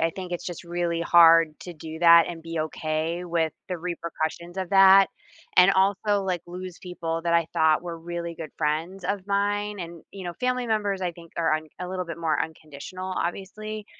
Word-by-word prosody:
I 165 Hz, 0 st, +2 dB
think 185 Hz, -2 st, -6 dB
it's 175 Hz, -, -4 dB
just 175 Hz, -2 st, -6 dB
really 170 Hz, -1 st, -2 dB
hard 165 Hz, -2 st, +6 dB
to 180 Hz, -, -8 dB
do 160 Hz, 0 st, -8 dB
that 170 Hz, 0 st, +7 dB
and 170 Hz, -1 st, -6 dB
be 165 Hz, -1 st, -3 dB
okay 155 Hz, +2 st, -2 dB
with 165 Hz, -2 st, 0 dB, 0.2 s
the 180 Hz, -, -2 dB
repercussions 170 Hz, 0 st, -4 dB
of 185 Hz, -2 st, -3 dB
that, 195 Hz, 0 st, +7 dB, 0.5 s
and 180 Hz, +1 st, +7 dB
also, 200 Hz, +1 st, +2 dB
like, 180 Hz, -3 st, -2 dB
lose 180 Hz, 0 st, -8 dB
people 165 Hz, -2 st, -4 dB
that 170 Hz, 0 st, +2 dB
I 170 Hz, -1 st, +3 dB
thought 160 Hz, 0 st, +3 dB
were 170 Hz, -1 st, -6 dB
really 170 Hz, 0 st, -5 dB
good 160 Hz, -2 st, -7 dB
friends 165 Hz, +5 st, -2 dB
of 200 Hz, -1 st, -2 dB
mine 205 Hz, +1 st, 0 dB
and, 170 Hz, -1 st, -8 dB
you 195 Hz, -2 st, -8 dB
know, 175 Hz, -1 st, -5 dB
family 250 Hz, -1 st, 0 dB
members 205 Hz, -3 st, 0 dB
I 180 Hz, -, 0 dB
think 170 Hz, 0 st, -15 dB
are 165 Hz, -2 st, +1 dB
un 155 Hz, 0 st, -3 dB
a 180 Hz, -, -4 dB
little 185 Hz, 0 st, -3 dB
bit 170 Hz, -1 st, -7 dB
more 160 Hz, -3 st, 0 dB
unconditional, 160 Hz, +4 st, -6 dB
obviously, 210 Hz, +4 st, -4 dB
175 Hz, 195 wpm, -25 LUFS, 165-190 Hz, 0.5 s, that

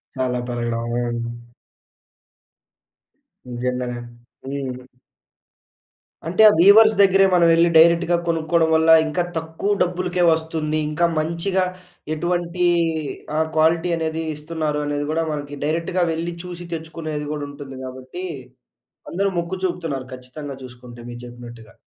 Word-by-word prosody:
చాలా 130 Hz, -1 st, -1 dB
పెరగడం. 120 Hz, -1 st, -2 dB
హ్మ్. 120 Hz, -1 st, -1 dB, 2.3 s
నిజంగానే. 125 Hz, 0 st, -2 dB, 0.5 s
హ్మ్. 130 Hz, -2 st, -5 dB, 1.4 s
అంటే 180 Hz, +5 st, +2 dB
ఆ -, -, +5 dB
వీవర్స్ 215 Hz, +4 st, +8 dB
దగ్గరే 195 Hz, 0 st, +6 dB
మనం 175 Hz, -1 st, +5 dB
వెళ్లి 170 Hz, +1 st, +4 dB
డైరెక్ట్‌గా 170 Hz, +1 st, +5 dB
కొనుక్కోవడం 165 Hz, 0 st, +2 dB
వల్ల, 160 Hz, 0 st, +3 dB, 0.2 s
ఇంకా 155 Hz, +3 st, 0 dB
తక్కువ 160 Hz, +5 st, -2 dB
డబ్బులకే 180 Hz, 0 st, 0 dB
వస్తుంది. 160 Hz, -1 st, -1 dB
ఇంకా 160 Hz, +3 st, +1 dB
మంచిగా 170 Hz, +4 st, 0 dB, 0.5 s
ఎటువంటి 175 Hz, +2 st, -1 dB, 0.7 s
ఆహ్, 160 Hz, 0 st, +1 dB
క్వాలిటీ 165 Hz, +2 st, +3 dB
అనేది 160 Hz, 0 st, -2 dB
ఇస్తున్నారు. 150 Hz, -1 st, -3 dB
అనేది 145 Hz, 0 st, -2 dB
గూడా 165 Hz, +1 st, 0 dB
మనకి 145 Hz, -1 st, -5 dB
డైరెక్ట్‌గా 165 Hz, +4 st, 0 dB
వెళ్లి 165 Hz, +2 st, -3 dB
చూసి 175 Hz, -1 st, -7 dB
తెచ్చుకునేది 160 Hz, -2 st, -5 dB
గూడా 150 Hz, -1 st, -4 dB
ఉంటుంది. 140 Hz, -2 st, -9 dB
గాబట్టి, 130 Hz, +7 st, -8 dB, 0.9 s
అందరూ 195 Hz, +3 st, +1 dB
మొక్కు 170 Hz, +2 st, -3 dB
చూపుతున్నారు 160 Hz, -8 st, -3 dB
ఖచ్చితంగా 135 Hz, +3 st, -8 dB
చూసుకుంటే 120 Hz, -1 st, -12 dB
మీరు 120 Hz, 0 st, -8 dB
చెప్పినట్టుగా. 120 Hz, -2 st, -12 dB
160 Hz, 115 wpm, -22 LUFS, 130-170 Hz, 2.3 s, వీవర్స్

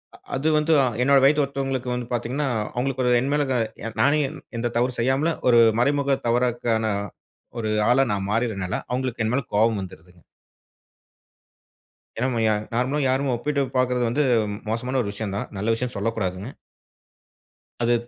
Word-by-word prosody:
அ -, -, -15 dB, 0.2 s
அது 140 Hz, +4 st, -1 dB
வந்து 155 Hz, +1 st, +2 dB, 0.3 s
என்னோட 140 Hz, +1 st, +5 dB
வயத்து 145 Hz, +1 st, +5 dB
ஒருத்தவங்களுக்கு 135 Hz, -2 st, -3 dB
வந்து 125 Hz, -1 st, -4 dB
பாத்தீங்கன்னா, 130 Hz, +4 st, -1 dB, 0.3 s
அவங்களுக்கு 130 Hz, +1 st, -1 dB
ஒரு, 125 Hz, -, +3 dB
என் 140 Hz, +2 st, -1 dB
மேல 145 Hz, -1 st, +2 dB, 0.6 s
நானே 150 Hz, +2 st, +4 dB, 0.4 s
எந்த 120 Hz, 0 st, -2 dB
தவறு 125 Hz, +1 st, 0 dB
செய்யாமலும், 135 Hz, +7 st, +1 dB
ஒரு 120 Hz, -1 st, +6 dB, 0.2 s
மறைமுக 140 Hz, 0 st, +2 dB
தவறுக்கான 120 Hz, -2 st, +1 dB, 0.7 s
ஒரு 110 Hz, -1 st, -2 dB, 0.2 s
ஆளா, 135 Hz, +2 st, +4 dB
நான் 100 Hz, 0 st, -3 dB
மாறிடுதுனால, 105 Hz, -4 st, -1 dB, 0.2 s
அவுங்களுக்கு 125 Hz, -2 st, -2 dB
என் 115 Hz, -, 0 dB
மேல 140 Hz, 0 st, 0 dB
கோவம் 110 Hz, -1 st, +3 dB
வந்துருதுங்க. 90 Hz, -1 st, -12 dB, 1.9 s
ஏன்னா, 125 Hz, -, 0 dB
நம்ம 120 Hz, -2 st, -1 dB
ய 110 Hz, -, +3 dB, 0.2 s
நார்மலா 130 Hz, +5 st, 0 dB
யாருமே 135 Hz, +1 st, +1 dB
ஒப்பிட்டு 140 Hz, +4 st, -1 dB
பாப்பது 125 Hz, -1 st, +1 dB
வந்து 145 Hz, +5 st, +1 dB, 0.5 s
மோசமான 125 Hz, +4 st, -1 dB
ஒரு 100 Hz, -3 st, -3 dB
விஷயம் 100 Hz, -1 st, -4 dB
தான். -, -, -4 dB
நல்ல 110 Hz, +3 st, +1 dB
விஷயம்னு 125 Hz, +1 st, -4 dB
சொல்லக்கூடாதுங்க. 100 Hz, -1 st, -2 dB, 1.3 s
அது 120 Hz, +1 st, +3 dB
125 Hz, 145 wpm, -23 LUFS, 115-135 Hz, 1.9 s, ஒரு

